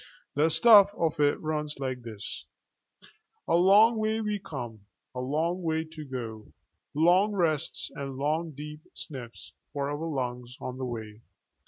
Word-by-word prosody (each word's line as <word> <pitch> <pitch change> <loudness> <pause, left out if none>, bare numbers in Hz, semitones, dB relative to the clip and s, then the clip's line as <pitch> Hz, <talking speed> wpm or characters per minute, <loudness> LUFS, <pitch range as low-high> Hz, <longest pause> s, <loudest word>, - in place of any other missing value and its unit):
The 150 +3 +3
stuff 200 +5 +8
of 160 -2 0
it 145 -1 +3
runs 150 -1 -2
like 130 -2 -3
this:A 110 +7 -10
long 200 +6 +6
way 220 0 0
we 210 -2 -1
come; 120 - -7 0.3
a 125 - -5
long 160 +8 -1
way 160 -1 0
to 155 -1 -8
go; 115 -6 -6 0.4
long 180 +7 +4
rests 160 -7 0
and 135 -1 -5
long 155 +4 0
deep 150 +1 -8
sniffs 125 -5 -7 0.2
for 140 -1 -2
our 150 +3 -3
lungs 125 -3 -4
on 130 -1 -6
the 130 - -2
way. 110 -3 -6
150 Hz, 145 wpm, -28 LUFS, 125-170 Hz, 0.4 s, stuff